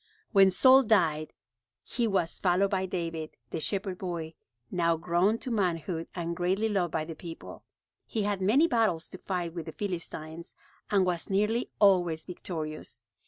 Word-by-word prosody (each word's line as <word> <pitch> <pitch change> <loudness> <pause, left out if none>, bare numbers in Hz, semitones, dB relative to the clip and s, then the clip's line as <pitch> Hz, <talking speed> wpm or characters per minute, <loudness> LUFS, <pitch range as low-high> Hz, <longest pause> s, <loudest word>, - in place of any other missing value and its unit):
When 195 -3 +7
Saul 260 +8 +7
died 165 - +2 0.5
he 235 -1 -1
was 190 -5 0
followed 190 +1 +2
by 190 -1 0
David, 165 -3 -4
the - - -2
shepherd 190 +2 -2
boy, 170 -3 -4 0.4
now 170 -2 +2
grown 175 +6 +2
to 250 - -6
manhood 175 -4 -1
and 170 -1 -3
greatly 185 +5 +1
loved 185 -5 0
by 155 0 -1
the 165 - -6
people. 165 0 -9 0.5
He 220 - -1
had 200 -1 -1
many 235 - +4
battles 220 - +1
to 185 - -10
fight 175 -3 -3
with 170 -2 -6
the - - -4
Philistines 170 -3 -6 0.3
and 195 -3 +3
was 175 -2 -2
nearly 210 +5 +1
always 175 -6 +3
victorious. 160 -4 -6
180 Hz, 160 wpm, -29 LUFS, 165-200 Hz, 0.5 s, When